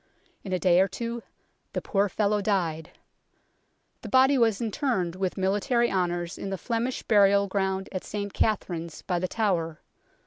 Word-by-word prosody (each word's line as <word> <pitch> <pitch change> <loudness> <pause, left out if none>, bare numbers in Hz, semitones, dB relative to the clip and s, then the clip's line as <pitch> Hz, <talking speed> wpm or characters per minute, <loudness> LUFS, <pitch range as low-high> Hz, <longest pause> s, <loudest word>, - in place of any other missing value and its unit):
In 190 - -6
a 185 - +2
day 180 0 +4
or 190 - +3
two 235 +4 -5 0.5
the - - 0
poor 200 0 +1
fellow 210 +1 +1
died. 170 -6 -1 1.1
The - - -7
body 265 +2 +5
was 225 -5 +3
interred 220 - -1
with 185 0 -2
military 205 +6 +1
honours 175 -2 -1
in 195 - -4
the 195 - -3
Flemish 235 +7 -2
burial 200 -1 +4
ground 190 -1 -1
at 185 - -4
St 205 -1 -5
Katharine's 170 -6 -1
by 180 -2 -1
The 185 - -1
Tower. 175 -7 -1
195 Hz, 160 wpm, -27 LUFS, 180-220 Hz, 1.1 s, body